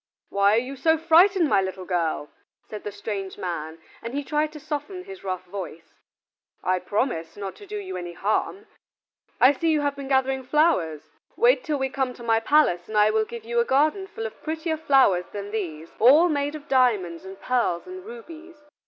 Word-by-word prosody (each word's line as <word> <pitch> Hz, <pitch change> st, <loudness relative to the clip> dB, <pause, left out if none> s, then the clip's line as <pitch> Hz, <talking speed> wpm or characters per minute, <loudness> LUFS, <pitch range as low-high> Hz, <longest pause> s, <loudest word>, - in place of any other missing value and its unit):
"Why 200 Hz, +1 st, +3 dB
are 230 Hz, -, +3 dB
you 260 Hz, +2 st, -7 dB
so 320 Hz, +4 st, +3 dB
frightened, 340 Hz, +2 st, +5 dB
my 200 Hz, -7 st, +3 dB
little 190 Hz, -1 st, -5 dB
girl?" 165 Hz, -5 st, -1 dB, 0.4 s
said 210 Hz, -1 st, -8 dB
the 205 Hz, -, -5 dB
strange 200 Hz, -1 st, -5 dB
man, 165 Hz, -3 st, -4 dB, 0.2 s
and 235 Hz, +3 st, -6 dB
he 285 Hz, -, -1 dB
tried 300 Hz, +2 st, 0 dB
to 305 Hz, -, -9 dB
soften 310 Hz, +5 st, -5 dB
his 390 Hz, 0 st, -11 dB
rough 185 Hz, -1 st, -3 dB
voice. 180 Hz, -3 st, -8 dB, 0.7 s
"I 185 Hz, 0 st, +1 dB
promise 180 Hz, -6 st, -2 dB
not 195 Hz, -2 st, -5 dB
to 410 Hz, -, -13 dB
do 420 Hz, +2 st, -5 dB
you 385 Hz, -2 st, -6 dB
any 175 Hz, -1 st, -6 dB
harm. 215 Hz, -, -1 dB, 0.7 s
I 255 Hz, -, +7 dB
see 325 Hz, +4 st, -1 dB
you 310 Hz, -2 st, +2 dB
have 285 Hz, -1 st, -1 dB
been 280 Hz, -1 st, -7 dB
gathering 265 Hz, 0 st, +1 dB
flowers? 255 Hz, -, +1 dB, 0.3 s
Wait -, -, +4 dB
till 305 Hz, -3 st, -1 dB
we 265 Hz, -1 st, -1 dB
come 265 Hz, -1 st, -2 dB
to 240 Hz, -, -12 dB
my 225 Hz, -1 st, +3 dB
palace 225 Hz, -, +2 dB
and 215 Hz, -, -2 dB
I 210 Hz, 0 st, +5 dB
will 220 Hz, 0 st, +1 dB
give 235 Hz, 0 st, -8 dB
you 235 Hz, +1 st, 0 dB
a -, -, +4 dB
garden 305 Hz, +10 st, +1 dB
full 450 Hz, +3 st, -6 dB
of -, -, -8 dB
prettier 320 Hz, +1 st, -2 dB
flowers 270 Hz, -, +3 dB
than 205 Hz, 0 st, -6 dB
these, 165 Hz, -7 st, -5 dB
all 295 Hz, +10 st, +7 dB
made 290 Hz, -1 st, -1 dB
of 295 Hz, -1 st, -10 dB
diamonds 210 Hz, -11 st, +2 dB
and 190 Hz, +1 st, -10 dB
pearls 235 Hz, -9 st, 0 dB
and 370 Hz, 0 st, -9 dB
rubies. 350 Hz, -7 st, -11 dB
255 Hz, 200 wpm, -25 LUFS, 195-315 Hz, 0.7 s, I